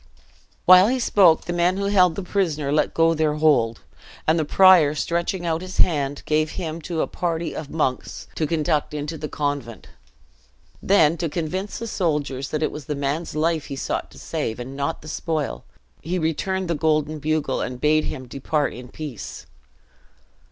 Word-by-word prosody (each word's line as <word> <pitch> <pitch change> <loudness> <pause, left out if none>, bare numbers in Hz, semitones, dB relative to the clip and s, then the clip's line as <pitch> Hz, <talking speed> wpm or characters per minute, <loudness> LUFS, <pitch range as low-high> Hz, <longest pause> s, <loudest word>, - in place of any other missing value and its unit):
While 185 +2 +8
he 255 +3 +1
spoke, 190 -9 +4
the 175 - -3
men 175 +2 +2
who 200 - -1
held 185 -4 +4
the 200 - -4
prisoner 160 -7 -1
let 150 - +1
go 165 0 +4
their 155 -2 +1
hold, 140 -8 +2 0.4
and 160 +1 +3
the - - +2
prior 175 -3 +6
stretching 170 +3 -1
out 165 0 0
his 185 0 -7
hand, 145 -4 +1
gave 155 0 +1
him 165 -3 -4
to 160 0 -2
a - - 0
party 170 -1 -3
of 150 - -6
monks 135 -5 -2
to 155 - -1
conduct 155 -1 0
into 150 +2 -4
the 150 -1 -6
convent. 145 -6 -4 0.9
Then, 170 -5 +4
to 165 0 -2
convince 180 +6 -3
the 230 - -5
soldiers 150 - -2
that 155 0 -2
it - - 0
was 150 -3 -8
the 150 - -3
man's 145 +4 -3
life 160 0 0
he 140 - -6
sought 135 - -3
to - - -16
save, 110 +1 -4
and 130 +3 -7
not 140 +3 -3
the - - -11
spoil, 155 - -3 0.4
he 175 +4 -2
returned 180 +3 -1
the 170 - 0
golden 155 0 0
bugle, 150 -2 -1
and 125 -1 -4
bade 155 +2 +3
him 130 -3 -6
depart 145 +3 -1
in 125 +1 -9
peace. 140 -3 -8
155 Hz, 180 wpm, -23 LUFS, 145-170 Hz, 0.9 s, While